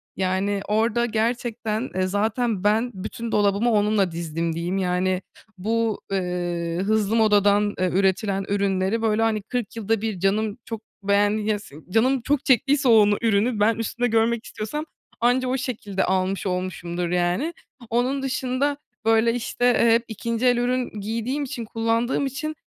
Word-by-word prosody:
Yani, 190 +2 0
orada 225 +3 +1
gerçekten, 230 0 -1
eee, 185 - 0
zaten 215 +1 0
ben 220 +4 +2
"bütün 220 +4 -6
dolabımı 205 +3 +2
onunla 210 -3 +2
dizdim" 165 0 -3
diyeyim. 175 +3 -2
Yani, 185 0 0 0.4
bu, 225 +3 -1
ııı, 175 -2 -2
hızlı 215 +1 +1
modadan, 205 -2 +3
eee, 185 0 +2
üretilen 195 +1 +1
ürünleri, 200 +1 0
böyle, 220 -1 +1
hani, 225 -1 +1
kırk 235 0 -4
yılda 225 -1 -1
bir 215 -4 -3
canım 205 +3 0
çok 225 -2 -6 0.2
beğen 205 +1 +3
ya 210 -1 -1
si 200 -8 -14
canım 250 +6 +2
çok 285 +3 0
çektiyse 275 +1 +3
onu 210 -3 +5
ürünü 220 +1 +2
ben 220 +2 +3
üstümde 230 +2 -1
görmek 230 0 +1
istiyorsam 295 +9 -5 0.3
anca 245 +2 +2
o 255 +1 0
şekilde 210 -7 -3
almış 190 +1 0
olmuşumdur, 180 -2 -3
yani. 180 - 0 0.4
Onun 250 +4 0
dışında, 265 +2 -1 0.3
böyle, 225 +1 +4
işte, 245 +1 -2
eee, 235 -1 +4
hep 230 0 +3
2'nci 230 +2 -3
el 245 -1 +4
ürün 245 -2 -1
giydiğim 230 +7 -2
için, 245 -4 -5
kullandığım 230 +4 0
için, 305 +4 -4
220 Hz, 150 wpm, -23 LUFS, 195-235 Hz, 0.4 s, onu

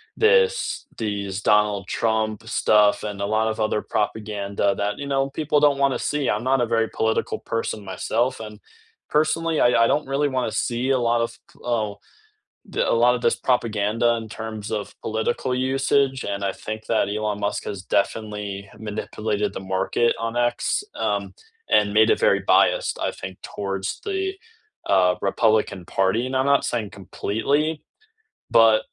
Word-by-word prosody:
this 470 -2 +2
these 100 -3 -3
Donald 105 -2 +2
Trump 110 0 -1
stuff 105 -2 +3
and 105 -2 -5
a - - 0
lot 110 +2 +1
of 110 0 -3
other 110 -1 0
propaganda 100 -2 -1
that, 105 +1 -2
you 140 - -5
know, 135 0 0
people 150 0 +1
don't 145 -1 +3
wanna 140 -1 +2
see, 145 -3 -1
I'm 105 +2 0
not 130 0 +2
a - - +3
very 115 -1 +1
political 110 0 0
person 115 -2 -3
myself 115 +7 -1
and 105 -1 -9 0.5
personally, 155 +1 +1
I 115 -1 +5
I - - +3
don't 145 +3 0
really 140 +2 +1
wanna 130 -4 -1
see 120 +3 -1
a 130 - +3
lot 120 0 +2
of 115 - -11
p - - -23 0.2
ul 110 -2 -1 0.9
that - - +1
a - - +3
lot 125 0 +5
of 125 - -3
this 115 - +2
propaganda 115 -2 +1
in - - -8
terms 110 -2 -6
of 105 - -9
political 110 +3 -1
usage, 135 +1 +1
and 100 -1 -3
I 95 - 0
think 110 0 -4
that 110 -3 +1
Elon 105 -1 -2
Musk 100 - -1
has 100 - -6 0.2
definitely 105 0 -3 0.4
manipulated 105 0 -2
the - - -6 0.2
market 115 +5 +2
on 115 0 -3 0.2
X, - - -1 0.2
um, - - +1 0.5
and 105 -1 +2
made 110 0 +6
it - - 0
very - - +4
biased, - - +3
I - - -1
think, 95 - -6 0.2
towards 95 -1 -3 0.2
the, 385 -1 -1 0.7
uh, 90 -1 +4 0.2
Republican 110 -3 +1
Party, 95 +5 +1
and 130 +1 -3
I'm 130 +1 +2
not - - +1
saying 110 -4 -2
completely, 115 - 0 0.9
but, 110 -1 +6
110 Hz, 170 wpm, -23 LUFS, 105-130 Hz, 0.9 s, made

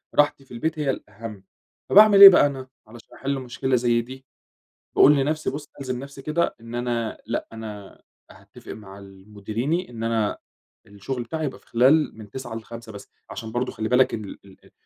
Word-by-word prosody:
راحتي 145 -2 +2
في - - -26
البيت 155 +6 -3
هي 145 -2 -1
الأهم، 105 -4 -6 0.5
فباعمل 205 -1 +7
إيه 195 - +15
بقى 180 - +5
أنا 135 -2 -4 0.2
علشان 115 0 -15
أحل 135 0 -3
مشكلة 130 +1 -2
زي 120 -1 +2
دي 130 +3 -11 0.7
باقول 150 - +7
لنفْسي 150 +3 -1
بُص 145 +1 -7
ألزم 130 -2 -4
نفْسي 140 +1 -10
كده 155 +4 -1
إن 115 +1 -9
أنا 120 -2 -2
لأ 115 +2 -3
أنا 105 -3 -9 0.3
هاتفق - - -14
مع 100 -2 -11
ال 95 +1 -16
مديريني 120 - -3
إن 115 -2 -7
أنا 115 -2 0 0.5
الشغل 110 +5 -6
بتاعي 160 +6 -4
يبقى 135 - -5
في - - -30
خلال 135 +4 +3
من 110 -2 -11
09:00 130 0 -7
ل17:00 115 0 -9
بس، 100 -1 -12 0.2
علشان 110 -2 -7
برضه 125 +2 -2
خلّي 110 0 -4
بالَك 125 +1 +3
إن 110 -2 -4
ال - - -10
ال 95 - -19
120 Hz, 185 wpm, -23 LUFS, 110-140 Hz, 0.7 s, إيه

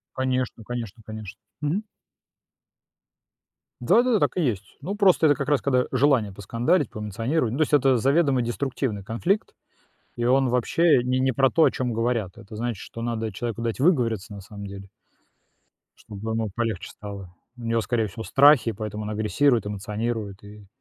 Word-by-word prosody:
Конечно, 130 -3 -1
конечно, 115 -2 -6
конечно, 110 -3 -9 0.2
мгм. 160 +9 -1 2.0
Да-да-да, 240 -3 +3
так - - +1
и 180 - +1
есть. 105 - -2
Ну, 190 +7 -3
просто 195 -6 +4
это 145 - +5
как 140 -1 -4
раз 145 -2 +3
когда 130 -2 +2
желание 130 -6 +2
поскандалить, 115 - 0
поэмоционировать. 115 +5 -2
Ну, 130 - -3
то 155 - +3
есть 155 - 0
это 135 -2 +4
заведомо 140 +1 +3
деструктивный 120 -3 -2
конфликт, 170 - -1 0.6
и 120 - -2
он 130 +1 +3
вообще 125 +4 +3
не 130 +1 +1
не 130 0 +2
про 135 +1 +3
то, 165 - +4
о - - +5
чём 125 -2 -2
говорят. 115 -5 -1
Это 105 +2 -11
значит, 120 0 -2
что 115 - -8
надо 115 -2 -2
человеку 115 +2 -4
дать 115 +2 -2
выговориться 115 - +1
на 100 - -8
самом 100 +1 -9
деле 100 0 -9 1.1
чтобы 105 +2 -6
ему 110 -1 -1
полегче 110 -2 -3
стало. 100 -3 -9 0.2
У 120 - -12
него, 115 0 +1
скорее 115 -1 0
всего, 110 +3 -8
страхи, 140 -4 +5
поэтому 105 0 -5
он 105 - -4
агрессирует, 110 +3 +1
эмоционирует 105 0 -4
и 105 0 -13
115 Hz, 165 wpm, -25 LUFS, 105-135 Hz, 2.0 s, это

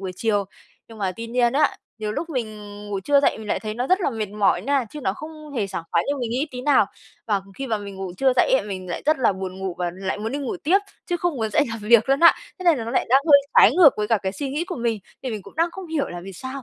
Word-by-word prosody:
buổi 190 -1 -4
chiều. 205 -3 +1 0.4
Nhưng 225 -1 -12
mà 190 -2 -1
tuy 230 0 -6
nhiên 240 0 +2
á, 290 +1 +2 0.2
nhiều 210 -1 -3
lúc 335 - -4
mình 220 -6 -3 0.3
ngủ 200 -1 -3
trưa 280 +8 +3
dậy 280 - +2
mình 215 -1 -8
lại - - 0
thấy 215 -1 -5
nó 245 +2 -2
rất 370 +5 +3
là 345 - +1
mệt 220 -3 -3
mỏi 210 0 +1
nha, 275 -2 +1
chứ 300 - -8
nó 190 -8 0
không 305 +3 -10
hề 215 -6 0
sảng 175 - -5
khoái 170 -1 +2
như 285 - 0
mình 235 -2 -2
nghĩ 265 +6 0
tí 250 0 -6
nào. 290 - +4 0.4
Và 205 -3 +1 0.2
khi 270 - -3
mà 220 -3 -1
mình 200 -1 -8
ngủ 190 -2 -5
trưa 265 -1 +3
dậy - - +3
á - - -7
mình 185 -2 -6
lại 170 - -4
rất 310 -1 +3
là 245 -5 +3
buồn 190 0 -6
ngủ 190 -2 -3
và 175 -1 -1
lại 190 +1 -3
muốn 220 +3 -4
đi 285 - -2
ngủ 285 +6 -3
tiếp, 350 +5 +3 0.3
chứ 350 - 0
không 350 -4 -1
muốn 220 -3 -2
dậy 290 - +3
làm 225 - -4
việc 230 +3 +5
luôn 275 +2 +3
á. 335 - +8 0.2
Thế 370 - -8
nên 335 -5 +5
là 225 - -4
nó 230 - -4
lại - - +1
đang 265 +3 +5
hơi 285 -2 +8 0.2
trái - - +8
ngược 335 -6 +9
với 210 0 -2
cả 225 - +3
cái 190 - -2
suy 270 +8 -4
nghĩ 300 +5 -2
của 355 -3 -6
mình, 230 -2 -1 0.2
thì 255 - -3
mình 210 -3 -5
cũng - - -14
đang 335 +1 +2
không 380 0 -8
hiểu 315 -3 -1
là 175 0 -7
vì 195 +2 -9
sao 260 +7 -7
235 Hz, 310 wpm, -23 LUFS, 205-285 Hz, 0.4 s, ngược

